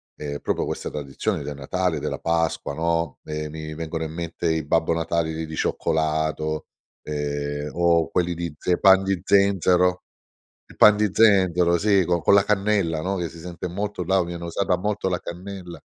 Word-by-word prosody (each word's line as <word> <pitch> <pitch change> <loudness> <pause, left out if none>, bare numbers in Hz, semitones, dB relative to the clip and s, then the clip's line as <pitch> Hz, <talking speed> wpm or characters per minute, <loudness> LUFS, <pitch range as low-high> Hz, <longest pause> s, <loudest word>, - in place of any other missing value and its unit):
ehm, 70 -1 -5
proprio - - -1
questa - - -4
tradizione 70 -2 -3
del 75 - -5
Natale, 85 +3 -1
della - - -4
Pasqua, 80 -3 -1
no? 85 0 -1
Ehm, 75 0 -4
mi 80 0 -6
vengono 80 0 -4
in 80 - -7
mente 85 0 -3
i 80 -2 -1
Babbo 80 +2 +2
Natale 80 -1 -1
di 80 0 -4
di 80 0 -7
cioccolato. 80 -1 -1 0.4
Ehm, 75 0 -3
o 85 -1 +3
quelli 90 -1 0
di 85 -2 -4
ze 90 +1 0
pan 95 0 +6
di 95 -2 -1
zenzero. 90 -2 +3 0.6
I - - -16
pan 105 -1 +7
di 105 0 +2
zenzero, 90 -5 +4
sì, 100 -1 +3
con 85 0 +1
con 100 - +5
la 100 - +6
cannella, 100 -6 +1
no? 95 +3 -1
Che 85 -2 -2
si 85 - -12
sente 90 +1 -6
molto, 100 +1 -3
là 95 +1 +2
viene 85 0 -6
usata 90 +2 0
molto 100 0 -1
la 90 -1 -1
cannella. 90 0 -8
85 Hz, 180 wpm, -23 LUFS, 80-95 Hz, 0.6 s, pan